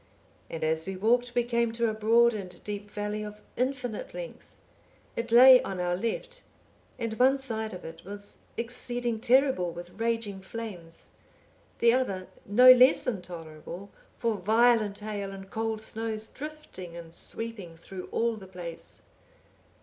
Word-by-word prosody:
And 165 - -5
as 160 +1 +1
we 195 - -3
walked 240 +5 +1
we 240 - +3
came 235 -1 +1
to 230 0 +1
a 220 - 0
broad 230 +2 +4
and 185 -4 -7
deep 205 0 -4
valley 210 +1 -3
of 210 0 -8
infinite 250 -3 -2
length; - - -8 0.7
it 230 0 -3
lay 255 +2 +9
on 190 -2 -5
our 175 0 0
left, - - -4 0.6
and 230 -3 -3
one 265 +2 +5
side 220 -5 -3
of 180 - -8
it 165 +1 -9
was 205 +1 -9 0.2
exceeding 240 -1 -1
terrible 250 -7 +3
with 175 +3 -10
raging 225 -4 -1
flames, 190 -5 -8 0.7
the 235 0 +5
other 200 -8 0 0.2
no 250 +6 +9
less 255 +1 +6
intolerable 175 -2 -6 0.3
for 230 -3 0
violent 220 +1 +3
hail 205 -2 -4
and 195 0 -10
cold 220 -1 -2
snows 220 -1 -3
drifting 285 - -8
and 165 -1 -10
sweeping 215 -7 -5
through 185 +2 -8
all 230 0 +1
the 190 -2 -11
place. 175 -3 -8
220 Hz, 150 wpm, -28 LUFS, 190-235 Hz, 0.7 s, lay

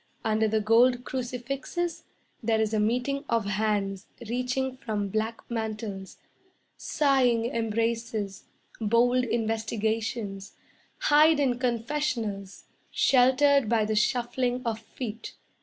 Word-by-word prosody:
Under 220 0 +2
the 215 0 +1
gold 240 +3 +4
crucifixes 265 +7 -4 0.4
There 225 -1 +1
is 220 0 0
a 215 - +2
meeting 250 +6 0
of 230 -3 +1
hands 200 -1 -1 0.2
Reaching 255 +2 -1
from 210 -5 -3
black 220 +3 -2
mantles. 215 -4 -5 0.6
Sighing 255 -6 +2
embraces, 225 -3 -2 0.3
bold 240 +3 +3
investigations, 220 -3 -2 0.5
Hide 305 +1 +5
in 255 -4 +1
confessionals, 235 -5 -2 0.3
Sheltered 265 0 +4
by 225 -2 +2
the 215 0 -1
shuffling 245 +2 0
of 225 -1 -1
feet. 225 0 -7
230 Hz, 105 wpm, -27 LUFS, 215-250 Hz, 0.6 s, Hide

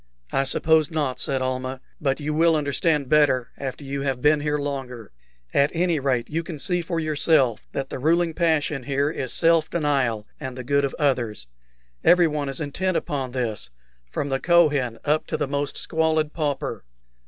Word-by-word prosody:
"I 135 - +1
suppose 155 +2 +3
not," 145 -5 -2
said 135 -1 -1
Almah; 130 0 -3 0.2
"but 135 -1 0
you 150 +1 -2
will 165 +1 +4
understand 150 0 +1
better 135 -4 +3
after 135 +1 -6
you 140 0 -4
have 135 -2 -1
been 150 +3 +4
here 150 0 0
longer. 135 -6 -5 0.4
At 140 +1 +4
any 170 -2 +1
rate, 130 -4 0
you 160 +2 -2
can 165 -1 -7
see 175 +4 0
for 170 0 -3
yourself 150 -6 +2
that 135 -1 -4
the - - -4
ruling 165 +4 +2
passion 155 -4 +1
here 140 +3 0
is 130 -6 -4
self 165 -1 +3
denial 135 -9 0
and 130 -3 -6
the 130 - -5
good 140 +2 +2
of 135 - -4
others. 120 - 0 0.6
Everyone 155 -5 +4
is 135 - -3
intent 170 +5 -1
upon 135 -3 -3
this, 120 - -3 0.4
from 140 - -3
the 135 0 0
Kohen 145 -9 +3
up 155 +1 +1
to - - -2
the - - -1
most 140 0 -2
squalid 160 -2 0
pauper." 150 -4 -2
145 Hz, 175 wpm, -24 LUFS, 130-160 Hz, 0.6 s, will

